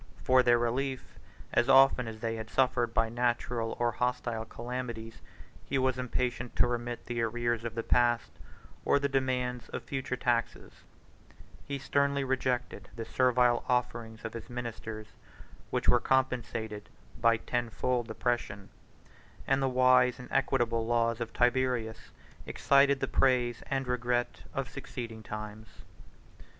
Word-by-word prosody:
For 130 0 +5
their 120 -1 +4
relief, 130 +3 -2 0.3
as 120 - +3
often 135 -2 +6
as 110 -1 -7
they 115 -1 -1
had 110 0 -6
suffered 125 -2 +2
by 115 0 +2
natural 120 0 -1
or 120 0 +2
hostile 120 -2 -2
calamities, 120 -1 -6 0.4
he 135 - -2
was 130 -1 +1
impatient 125 -1 -2
to - - +4
remit 120 0 -3
the 120 -1 -2
arrears 120 0 -1
of 115 -1 -5
the 115 - -2
past, 120 -1 +2 0.5
or - - +3
the 140 0 +1
demands 125 -2 -1
of - - -5
future 135 -2 -3
taxes: 120 -2 -1 0.9
he 140 - -2
sternly 140 +1 +1
rejected 130 -5 -2
the 115 -1 -5
servile 125 0 +3
offerings 115 -2 -1
of 110 - -5
his 115 -2 -8
ministers, 115 -3 -6 0.6
which - - -2
were - - +6
compensated 115 -5 -1 0.3
by 115 0 +4
tenfold 120 +1 -1
oppression; 115 -5 -2 0.8
and 135 0 +2
the 135 - +2
wise 125 -1 +4
and 125 - -10
equitable 120 -4 +1
laws 115 0 +1
of 115 - -3
Tiberius 120 -3 0 0.4
excited 140 0 +3
the - - 0
praise 125 -3 +2
and 135 -1 -1
regret 125 0 -1
of - - -3
succeeding 115 -2 -7
times. 105 0 -7
120 Hz, 140 wpm, -30 LUFS, 115-130 Hz, 0.9 s, often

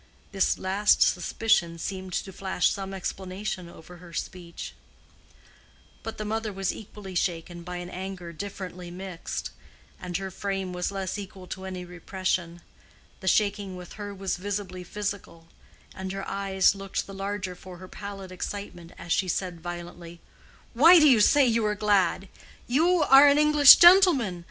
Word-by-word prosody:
This 195 -1 +1
last 195 +3 +3
suspicion 175 -2 +1
seemed 185 +1 -6
to 190 - -3
flash 190 -1 0
some 195 -1 -5
explanation 190 -1 -5
over 175 +1 -14
her 175 -1 -14
speech. 170 0 -7 1.3
But 225 - -7
the 215 - -5
mother 220 0 -2
was 195 -1 -2
equally 205 -2 -10
shaken 175 -1 -2
by 180 +1 -6
an 175 0 -7
anger 185 -2 -7
differently 185 -1 -7
mixed, 180 -1 -6 0.5
and 180 -1 -4
her 195 -1 -6
frame 195 -1 -4
was 180 0 -2
less 195 +1 -4
equal 190 -2 -9
to 190 0 -6
any 185 -1 -6
repression. 180 -1 -3 0.6
The 190 - -8
shaking 200 -1 +1
with 180 -1 -10
her 205 -1 -7
was 195 -2 -3
visibly 190 -1 -5
physical, 200 -4 -6 0.4
and 190 0 -6
her 195 0 -5
eyes 195 -1 +2
looked 195 -1 -4
the 195 - -10
larger 195 -1 -4
for 180 0 -12
her 185 +1 -11
pallid 195 -1 -8
excitement 180 -2 -7
as 170 - -8
she 190 - +2
said 180 -1 -3
violently, 175 0 -8 0.5
"Why 325 +9 +8
do 305 -2 +6
you 255 -6 +6
say 285 +6 +5
you 230 -2 +1
are 210 - -1
glad? 200 -2 +1 0.4
You 330 +6 +2
are 275 0 +8
an 285 0 +5
English 300 -2 +9
gentleman. 345 - +6
190 Hz, 155 wpm, -26 LUFS, 180-205 Hz, 1.3 s, English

